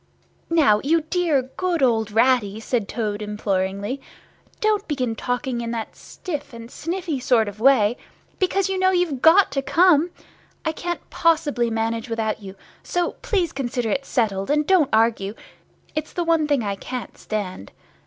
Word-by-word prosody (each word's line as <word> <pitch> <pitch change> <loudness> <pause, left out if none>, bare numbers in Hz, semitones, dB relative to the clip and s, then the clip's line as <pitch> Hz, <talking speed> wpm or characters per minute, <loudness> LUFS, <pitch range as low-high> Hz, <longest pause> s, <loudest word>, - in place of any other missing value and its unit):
_'" - - -39 0.5
"Now, 215 -10 +5
you 325 +4 +3
dear 315 -4 +1
good 355 -5 0
old 225 -4 +2
Ratty," 220 -2 +2
said 225 -2 -1
Toad, 215 -3 -2
imploringly, 205 +3 -2 0.6
"don't 425 -1 +1
begin 255 -6 -1
talking 245 +1 -2
in 230 - -4
that 230 -2 -4
stiff 290 -6 -7
and 230 +1 -10
sniffy 335 -3 -3
sort 240 -3 +2
of 205 +1 -7
way, 240 -2 +4 0.4
because 380 0 +1
you 385 -1 -2
know 375 0 +4
you've 350 -8 0
got 345 +3 +6
to 275 0 -1
come. 320 +3 +4 0.6
I 320 - +1
can't 345 +2 -5
possibly 295 -8 +2
manage 225 +1 -2
without 220 -1 -2
you, 195 -1 -9 0.3
so 350 -1 -1
please 395 -9 0
consider 245 -5 -2
it 275 - 0
settled, 210 -7 -1
and 300 +1 +2
don't 360 -6 +4
argue—it's 225 +7 -2
the 350 - -1
one 330 -2 +2
thing 285 -5 +1
I 200 -1 -1
can't 250 +3 -6
stand. 185 - -5
255 Hz, 160 wpm, -23 LUFS, 220-325 Hz, 0.6 s, got